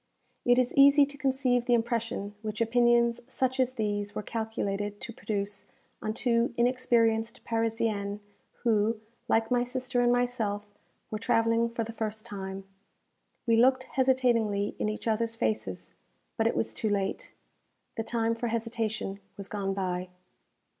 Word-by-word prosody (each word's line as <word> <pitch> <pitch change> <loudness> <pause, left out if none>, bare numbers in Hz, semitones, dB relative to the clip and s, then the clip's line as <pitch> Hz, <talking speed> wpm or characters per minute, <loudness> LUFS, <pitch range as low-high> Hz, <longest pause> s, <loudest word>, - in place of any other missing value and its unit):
It 245 0 +5
is 250 -1 +2
easy 280 +1 +7
to 285 0 -10
conceive 260 -3 +1
the 245 - +4
impression 230 -3 -1
which 215 0 -4
opinions 235 0 +3
such 260 0 -1
as 255 0 +2
these 205 -3 -2
were 215 - -3
calculated 205 -2 -3
to 235 - -6
produce 205 -2 -3 0.4
on 215 0 -2
two 235 0 +1
inexperienced 235 -2 +2
Parisiennes, 225 -3 -1 0.4
who, 220 -1 +2 0.3
like 225 +1 +2
my 245 -1 +3
sister 250 0 -1
and 240 0 +4
myself, 240 -4 0 0.5
were 215 - -2
travelling 230 +1 +2
for 230 0 -2
the 230 +1 -7
first 220 -1 -4
time. 195 -3 -6 0.8
We 230 -1 +4
looked 260 +2 +5
hesitatingly 240 -6 +2
in 215 - 0
each 215 +2 -5
others 230 +1 0
faces; 220 -1 -2 0.4
but 225 -1 +2
it - - 0
was 225 - 0
too 220 - -1
late. 195 -1 -2 0.6
The 225 - -1
time 230 0 0
for 235 +1 -3
hesitation 225 -3 -2 0.2
was 200 -1 -6
gone 195 -2 -2
by. 180 -1 -2
230 Hz, 145 wpm, -29 LUFS, 210-245 Hz, 0.8 s, easy